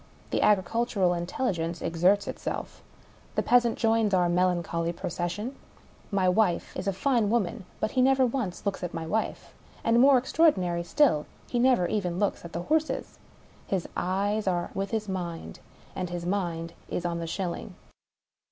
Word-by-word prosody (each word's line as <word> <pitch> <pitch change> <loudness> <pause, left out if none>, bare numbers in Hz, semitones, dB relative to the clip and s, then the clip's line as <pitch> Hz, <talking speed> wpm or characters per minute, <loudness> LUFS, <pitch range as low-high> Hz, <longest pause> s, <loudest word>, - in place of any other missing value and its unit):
The - - +1
agricultural 205 -1 +2
intelligence 175 -1 -2
exerts 180 +5 +2
itself. - - -5 0.5
The - - +1
peasant 240 -2 +3
joins 225 -3 +2
our 175 -1 +3
melancholy 175 -1 +1
procession. 175 +9 -4 0.5
My 195 -3 +1
wife 180 -1 +1
is 185 - -4
a - - +3
fine 230 +1 +1
woman, 215 -2 0
but 215 - -1
he 255 - +2
never 265 0 +4
once 230 -8 -3
looks 200 - -1
at 175 - -4
my 165 -1 -3
wife 215 +7 -2 0.2
— - - -25
and, 230 +1 +4
more 270 +1 +7
extraordinary 240 - +2
still, 205 - +2 0.2
he 245 - -1
never 250 -7 +4
even 180 -2 -1
looks 205 0 0
at 170 - -8
the 170 +1 -4
horses. 315 - -1 0.5
His 190 -3 -1
eyes 200 +3 0
are 175 -2 0
with 195 0 -2
his 220 -2 -2
mind 175 -3 -5 0.2
— - - -26
and 180 -2 -3
his 175 -1 -4
mind 170 -3 -2 0.2
is 180 - -3
on 170 -1 -1
the 165 - -4
shil 175 +2 -2
ling. - - -8
190 Hz, 170 wpm, -27 LUFS, 175-225 Hz, 0.5 s, more